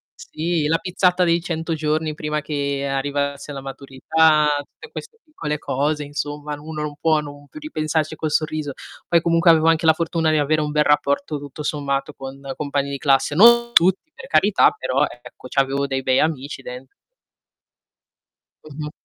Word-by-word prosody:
sì 160 -1 -2
la 165 - +2
pizzata 180 0 +1
dei 170 0 +2
100 165 -2 -3
giorni 155 0 -1
prima 150 0 -3
che 140 -2 -2
arrivasse 140 +1 -2
la 135 - -6
maturità, 150 +3 +2
tutte 455 - -12
queste 455 - -9
piccole 150 - -4
cose, 150 +2 -1
insomma, 145 +1 -5
uno 155 0 -6
non 150 -1 -5
può 160 -1 +3
non 145 0 -11
più 305 - -11
ripensarci 155 - -2
col 155 -1 -3
sorriso. 155 -2 -1 0.3
Poi 170 -1 +3
comunque 170 0 +3
avevo 160 0 +5
anche 165 0 +2
la 160 - +7
fortuna 165 0 0
di 155 - +2
avere 155 +1 +1
un 150 0 -2
bel 150 0 +3
rapporto, 150 +2 +1
tutto 145 +1 -8
sommato, 140 -1 -2
con 135 0 -9 0.2
compagni 140 -1 -2
di 140 - -3
classe, 135 0 +2
non 235 +4 +6
tutti, 190 - +3
per 265 - -11
carità, 200 - +4
però 135 -9 0
ecco 120 +1 -12
c'avevo 135 +1 0
dei 135 -1 -2
bei 130 0 +2
amici 145 -3 -2
dent 125 0 -9 1.8
Mh-mh. 150 +1 -6
150 Hz, 165 wpm, -21 LUFS, 140-160 Hz, 1.8 s, la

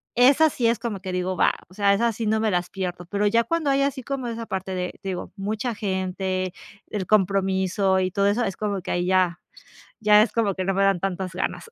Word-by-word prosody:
esas 280 +6 +5
sí 235 - +1
es 230 0 +2
como 230 -4 -4
que 185 0 -6
digo, 180 +1 -1
va, - - +3 0.2
o - - -17
sea, 200 0 +3
esas 230 +1 +1
sí 225 - -3
no 220 +1 +2
me 220 -1 +1
las 180 -1 -1
pierdo, 180 -2 -4
pero 205 +2 0
ya 230 +3 +3
cuando 315 +2 0
hay 275 0 +2
así 275 -2 -1
como 270 -1 -3
esa 230 0 -4
parte 190 -2 -4
de, 180 0 -2
te 195 - -5
digo, 180 -2 -5
mucha 215 +5 -2
gente, 190 -2 -2 0.4
el 195 -4 -3
compromiso 190 -1 +2
y 185 0 0
todo 200 +2 +2
eso, 210 +5 +1
es 195 - -3
como 205 -3 -2
que 185 - -5
ahí 175 0 0
ya 185 -2 +2 0.6
ya 210 -1 +6
es 225 - 0
como 215 -4 +1
que 185 - -3
no 195 - +1
me 195 - +2
dan 195 -3 +2
tantas 190 -1 -3
ganas. 185 - -3
195 Hz, 240 wpm, -24 LUFS, 185-225 Hz, 0.6 s, ya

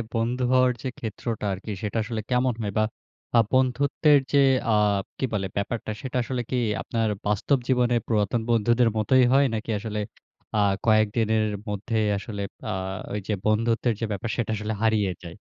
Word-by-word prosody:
বন্ধু 120 +3 0
হওয়ার 130 0 +5
যে, 130 - -4
ক্ষেত্রটা 110 0 -4
আরকি, 95 +3 -6
সেটা 105 +1 -2
আসলে 110 0 -4
কেমন 125 0 +2
হয়? 105 -2 -2
বা 110 - +4 0.5
আ - - +8
বন্ধুত্বের 140 +3 +3
যে, 145 - +5 0.4
আ - - +4 0.4
কি - - 0
বলে? 100 -2 -1
ব্যাপারটা 110 +2 -2
সেটা 130 -2 -3
আসলে 125 0 -2
কি 130 - 0 0.2
আপনার 115 -1 -1 0.2
বাস্তব 105 +7 +2
জীবনে 125 -2 +2
পুরাতন 110 +1 +1
বন্ধুদের 120 +1 +3
মতোই 130 +4 +4
হয়? 140 +1 +5
নাকি 110 +1 -4
আসলে 105 0 -4 0.6
আ - - +3 0.3
কয়েকদিনের 110 0 +3 0.2
মধ্যেই 110 +2 -1
আসলে 100 +1 -6 0.3
আ - - -1 0.4
ওই 105 - -1
যে, 110 - 0
বন্ধুত্বের 115 +2 +2
যে, 115 - -1
ব্যাপার, 105 +3 -3
সেটা 115 -3 -2
আসলে 105 +1 -3
হারিয়ে 110 -4 +2
যায়? 85 -1 -8
115 Hz, 165 wpm, -25 LUFS, 105-125 Hz, 0.6 s, আ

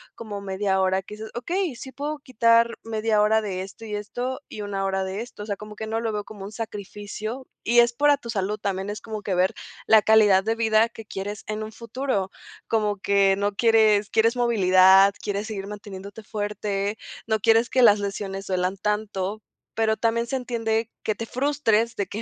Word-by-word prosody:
como 210 -3 -6
media 190 0 0
hora, 190 0 +2
que 210 - -10
dices: 220 +1 -8
"Okey, 340 +5 -2
sí 260 +3 -9
puedo 295 +3 -4
quitar 230 -3 +3
media 220 -1 +1
hora 215 +1 +4
de 190 -3 -3
esto, 195 +4 -9
y 215 - -6
esto, 245 +6 -4
y 210 - -7
1 200 -1 -3
hora 190 0 0
de 190 +3 -4
esto", 235 -3 -8
o - - -7
sea, 205 -2 -3
como 210 +1 -10
que 220 - -5
no 220 +1 -2
lo 230 -1 -2
veo 210 0 -2
como 205 -1 -10
un 200 - -8
sacrificio, 215 +2 -6 0.2
y 240 +1 +4
es 235 0 +2
por 290 +4 +3
a 290 - +5
tu 240 -4 -10
salud, 205 -1 -1
también 195 0 -2
es 210 +1 -4
como 215 -2 -6
que 195 -2 -2
ver 185 +1 +2 0.3
la 220 -1 +6
calidad 210 -3 +5
de 225 +2 0
vida 225 0 +3
que 225 -1 -11
quieres 205 +1 -6
en 215 0 -3
un 215 0 -6
futuro. 230 -3 -3 0.4
Como 210 -2 0
que 195 0 +3
no 200 0 0
quieres 215 -2 +4
quieres 225 +3 +3
movilidad, 195 -4 +5
quieres 205 +1 -2
seguir 200 -3 -5
manteniéndote 205 0 -9
fuerte, 205 -1 -3 0.3
no 220 -1 +1
quieres 225 +2 +4
que 255 - +3
las 210 -3 +7
lesiones 195 -1 -4
duelan 185 +1 -1
tanto, 210 0 -2 0.3
pero 220 -1 +2
también 230 +1 0
se 265 - -2
entiende 230 -3 -1
que 215 - 0
te 230 - -5
frustres 240 -4 +1
de 200 - -1
que 210 +4 -5
215 Hz, 205 wpm, -24 LUFS, 200-230 Hz, 0.4 s, las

